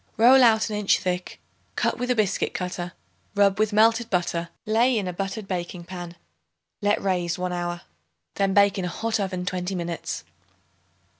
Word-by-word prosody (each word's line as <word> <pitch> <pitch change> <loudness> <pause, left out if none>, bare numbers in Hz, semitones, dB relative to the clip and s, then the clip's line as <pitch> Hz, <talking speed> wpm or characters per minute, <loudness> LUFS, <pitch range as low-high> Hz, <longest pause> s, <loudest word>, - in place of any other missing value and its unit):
Roll 255 +3 +7
out 220 -2 +4
an - - -2
inch 210 -1 +3
thick; 180 -2 -3 0.4
cut - - 0
with 250 0 -2
a 250 - +3
biscuit 210 -4 0
cutter; 180 -1 -4 0.4
rub 200 -1 +3
with 215 0 +2
melted 225 +2 +3
butter; 175 -2 -1 0.2
lay 230 +3 +3
in 200 -3 -1
a 180 - -3
buttered 195 +3 -4
baking 175 -1 -4
pan; 175 -1 -8 0.7
let 205 0 +2
raise 180 -3 -1
one 180 0 -2
hour; 175 0 -3 0.5
then 195 -1 +1
bake 200 0 +4
in 185 - -2
a - - -1
hot 225 +5 -2
oven 185 -2 -2
twenty 180 +1 -2
minutes. 170 -1 -4
195 Hz, 170 wpm, -25 LUFS, 180-215 Hz, 0.7 s, Roll